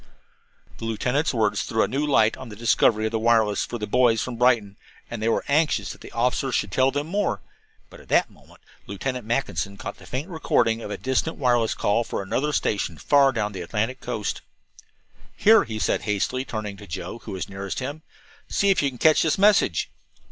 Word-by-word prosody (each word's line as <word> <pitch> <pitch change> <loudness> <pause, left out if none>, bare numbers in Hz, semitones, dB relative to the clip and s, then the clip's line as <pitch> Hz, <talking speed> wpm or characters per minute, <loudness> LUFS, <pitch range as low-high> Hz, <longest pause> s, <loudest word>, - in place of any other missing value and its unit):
The - - -5
lieutenant's 125 +7 0
words 105 -4 +1
threw 110 - 0
a - - +1
new 140 +3 -1
light 115 -6 +3
on - - -10
the 105 - -9
history 110 -1 +2
of 110 - -1
the 110 - -1
wireless 110 -2 +2
for 120 - -5
the 105 - -4
boys 115 0 +3
from 125 +1 -3
Brighton, 115 -5 +2 0.4
and 115 -2 -5
they 110 - +1
were - - 0
anxious 145 -8 +1
that - - -12
the - - -11
officer 125 +3 0
should 100 -4 -1
tell 130 +6 +3
them 145 +2 -2
more; 200 +5 -1 0.5
but - - -13
at - - -18
that - - +3
moment - - -20 0.3
Lieutenant 125 +4 -4
Mackinson 115 -5 -2
caught - - -7
the - - -15
faint 135 +6 -4
recording 120 -10 +1
of 105 - -6
a 100 - -4
distant 130 +5 -1
wireless 120 -4 +2
call 110 +3 +1
for 100 - -4
another 140 +10 -1
station, 100 - -1
far 140 - +4
down 105 -4 -2
the 95 -3 -6
Atlantic 110 +8 -2
coast. 110 -4 -3 1.0
"Here," 220 0 +6
he 110 - -5
said - - 0
hastily, 110 +5 -1
turning 105 -5 -5
to 100 0 -12
Joe, 95 +6 -6
who - - -8
was 95 - -4
nearest 100 0 -6
him, 140 +4 -4 0.5
"see 200 0 +2
if 195 - +2
you 140 - +1
can 125 - -11
catch 155 +4 +4
this 160 - +1
message." 200 - +3
115 Hz, 205 wpm, -24 LUFS, 105-135 Hz, 1.0 s, Here